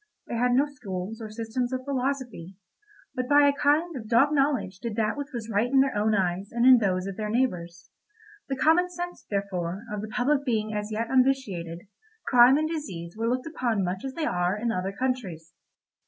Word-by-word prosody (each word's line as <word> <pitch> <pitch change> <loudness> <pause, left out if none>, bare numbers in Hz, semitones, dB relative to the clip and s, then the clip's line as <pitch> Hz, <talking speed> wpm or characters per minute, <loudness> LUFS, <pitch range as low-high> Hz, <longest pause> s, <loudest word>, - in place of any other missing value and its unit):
They - - -7
had 245 +1 +2
no 270 +3 +4
schools 220 -6 -6
or 220 - -6
systems 230 +3 -3
of 255 0 -3
philosophy, 255 -9 -3 0.6
but 255 0 -3
by 290 0 +6
a 285 - +4
kind 295 +4 +1
of 225 -4 -7
dog 240 +6 +4
knowledge 270 -11 0
did 230 -2 -4
that 215 -1 0
which 285 -1 -6
was 235 -3 -5
right 220 +2 0
in 270 - +5
their 270 -3 0
own 215 +1 +2
eyes 190 +1 -1
and 235 +1 +1
in 255 -1 +8
those 185 -3 0
of 195 -1 -6
their 215 -1 -3
neighbours; 180 -8 -2 0.6
the 270 - -1
common 325 +6 +3
sense, 350 0 -6
therefore, 195 -1 -3
of 210 - -3
the 215 - -5
public 260 +5 +1
being 220 -5 -1
as 210 0 -3
yet 225 +2 -2
unvitiated, 225 -11 +1 0.4
crime 250 +2 +6
and 310 +1 0
disease 190 - -6
were 225 +1 -1
looked 255 +1 -1
upon 240 -10 -1
much 185 +1 -3
as 265 -1 -5
they 325 - -1
are 180 - 0
in 230 +2 -1
other 185 -1 -2
countries. 195 -10 -3
230 Hz, 200 wpm, -26 LUFS, 195-270 Hz, 0.6 s, in